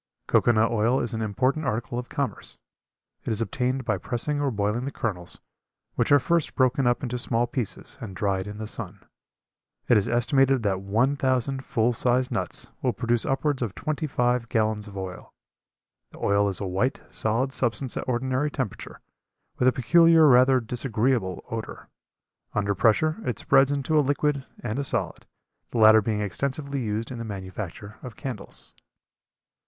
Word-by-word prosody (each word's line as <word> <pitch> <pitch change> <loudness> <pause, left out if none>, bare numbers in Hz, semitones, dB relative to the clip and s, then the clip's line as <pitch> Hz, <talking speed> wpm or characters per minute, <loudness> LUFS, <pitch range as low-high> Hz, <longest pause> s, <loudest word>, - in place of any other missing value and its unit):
Cocoa - - +3
nut 110 0 +2
oil 115 +3 +2
is 120 - -2
an 110 - -3
important 130 +8 0
article 115 +1 -2
of 125 - -8
commerce. - - -4 0.7
It - - -4
is 110 -2 0
obtained 125 +4 -1
by 110 -5 0
pressing 145 +8 -1
or 140 - +1
boiling 105 +2 -1
the - - -2
kernels, 90 -9 -4 0.5
which - - 0
are 145 - +8
first 170 +2 0
broken 130 0 +2
up 120 +4 +1
into 125 -1 -3
small 120 0 +1
pieces 120 -3 -4
and 95 -5 -7
dried 95 0 -1
in 105 0 -7
the 110 - -5
sun. 105 -3 -6 0.8
It 120 - +5
is 100 - -1
estimated 135 +1 +2
that 95 -2 0
one 115 +8 +1
thousand 130 0 0
full 115 0 +1
sized 125 +2 +1
nuts - - -3
will - - +1
produce 120 0 0
upwards 135 0 0
of 110 -5 -3
twenty 155 0 -3
five 125 -3 0
gallons 110 -1 0
of 100 -1 -10
oil. 95 -1 -7 0.7
The - - -15
oil 100 0 +2
is 95 - -4
a 100 - -3
white, 95 +8 -1
solid 120 +5 0
substance 125 +1 0
at - - -3
ordinary 130 +4 0
temperature, 130 -8 -5 0.6
with 125 - +3
a - - +6
peculiar 165 +6 +5
rather 130 -1 +6
disagreeable 115 -4 -1
odor. 115 -1 -6 0.7
Under 100 -1 +1
pressure 115 - +2
it 125 - -2
spreads 135 +1 +4
into 145 +2 +1
a - - +6
liquid 145 -1 0 0.2
and 120 +2 -2
a - - 0
solid, - - -3 0.4
the - - -4
latter 110 0 +7
being 105 0 -1
extensively 140 - -3
used 110 +2 -3
in 125 - -6
the - - -4
manufacture 100 0 -7
of 125 -4 -9
candles. 130 -7 -8
120 Hz, 170 wpm, -25 LUFS, 105-135 Hz, 0.8 s, are